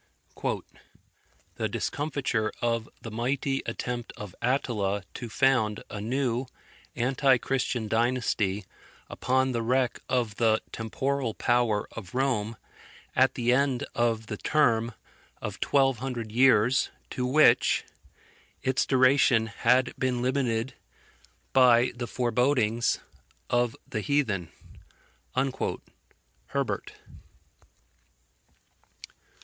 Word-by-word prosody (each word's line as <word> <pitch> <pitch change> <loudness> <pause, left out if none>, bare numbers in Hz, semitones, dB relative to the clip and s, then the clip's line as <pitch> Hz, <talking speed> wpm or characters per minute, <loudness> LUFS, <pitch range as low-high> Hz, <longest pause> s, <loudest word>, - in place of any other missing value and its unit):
"The - - -1
discomfiture 135 -6 -1
of 115 -1 -1
the 115 - -6
mighty 135 +4 -1
attempt 120 -1 -4
of 105 -4 -8
Attila 105 -6 0
to 120 -2 -6
found 120 -4 +2
a 105 - -5
new 125 +2 -1 0.5
anti 130 +2 +3
Christian 125 -3 -1
dynasty 110 -4 0 0.5
upon 130 +1 +1
the 120 -2 -1
wreck 125 +1 +1
of 120 -5 0
the 110 -2 +3
temporal 130 +2 -2
power 120 -4 +1
of 100 -1 -9
Rome, 120 -5 0 0.6
at 130 +1 +4
the 120 0 +2
end 135 -1 +1
of 115 -2 0
the 105 -1 -5
term 115 -6 +2 0.5
of - - -6
twelve 135 -4 +2
hundred 120 -4 -4
years, 125 0 +4 0.2
to 125 - -3
which 130 -1 +4 0.8
its 130 -1 +1
duration 130 -3 +4
had 120 +4 +2
been 125 -2 0
limited 130 -2 0 0.8
by 125 -2 +5
the 120 0 -5
forebodings 120 -1 +1 0.5
of 120 -1 +2
the 110 - -3
heathen." 105 - 0 2.0
HERBERT. - - -2
120 Hz, 100 wpm, -27 LUFS, 115-130 Hz, 2.0 s, by